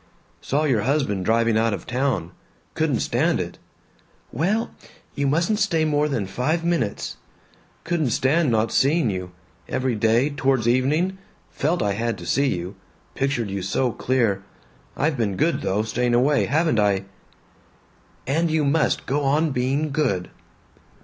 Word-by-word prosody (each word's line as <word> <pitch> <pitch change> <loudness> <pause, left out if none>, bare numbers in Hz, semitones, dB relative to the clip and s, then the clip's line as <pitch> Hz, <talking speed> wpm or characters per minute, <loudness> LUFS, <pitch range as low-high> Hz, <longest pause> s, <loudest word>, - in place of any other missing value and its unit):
"Saw 145 +3 0
your 130 -8 +2
husband 115 -8 0
driving 115 0 +2
out 115 -2 +1
of - - -10
town. 125 -9 -1 0.4
Couldn't - - 0
stand - - +1
it." - - -5 0.7
"Well 195 - 0 0.4
You 140 0 -1
mustn't 170 +9 +1
stay 165 -7 +2
more 150 0 +1
than 120 -8 -1
five 145 - -1
minutes." 170 -12 -1 0.7
"Couldn't 165 -5 0
stand 145 +6 +2
not 110 -1 +1
seeing 140 -3 +2
you. 90 -1 -5 0.4
Every 130 -1 0
day, 115 +6 +2
towards 135 -4 +1
evening, 150 +10 +1 0.3
felt 165 +5 0
I 100 - +1
had 115 +3 -2
to - - -9
see 140 +1 +2
you 90 -4 -3 0.4
pictured 125 -6 -1
you 100 0 -3
so 110 +7 0
clear. 115 -6 0 0.6
I've 145 0 0
been 105 -5 0
good 165 +3 +1
though, 100 +3 0
staying 120 +2 0
away, 140 +4 +3
haven't 155 -3 +1
I!" 100 -2 +2 1.2
"And 160 +6 +1
you 155 -1 +1
must 150 +2 +1
go 145 +2 0
on 150 +3 +2
being 135 +4 0
good." 130 - -1
130 Hz, 150 wpm, -23 LUFS, 110-150 Hz, 1.2 s, away